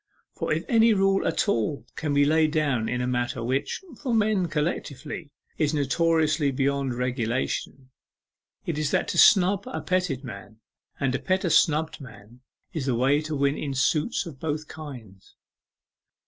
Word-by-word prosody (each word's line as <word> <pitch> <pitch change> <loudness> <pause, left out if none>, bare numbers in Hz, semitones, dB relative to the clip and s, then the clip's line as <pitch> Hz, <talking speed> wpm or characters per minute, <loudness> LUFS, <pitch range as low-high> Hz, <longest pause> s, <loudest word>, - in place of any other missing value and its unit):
For - - -3
if 160 +2 0
any 225 -1 +4
rule 195 0 +2
at - - 0
all 115 - -1
can 155 -2 -2
be 145 0 +4
laid 155 +1 +3
down 140 -8 0
in 125 0 -1
a 125 - -1
matter 125 -1 -1
which, 130 - -1 0.2
for 255 -5 0
men 210 -4 +2
collectively, 150 -1 -3 0.3
is 155 0 +1
notoriously 155 +1 +2
beyond 135 -1 0
regulation, 125 +2 -2 0.7
it 160 -3 -2
is 150 -2 0
that - - 0
to - - 0
snub 195 -1 +5
a 255 - -4
petted 180 -8 -1
man, 110 -3 -9 0.4
and 135 -2 0
to 130 - -1
pet 190 +1 0
a 170 - +1
snubbed 155 0 +2
man, 115 -1 -13 0.3
is 150 -6 -3
the 125 - +1
way 135 +5 +2
to 155 0 -4
win 140 0 +1
in 140 -3 -4
suits 150 - +1
of 150 -6 -10
both 155 -1 -3
kinds. 125 -11 -11
145 Hz, 165 wpm, -26 LUFS, 130-165 Hz, 0.7 s, snub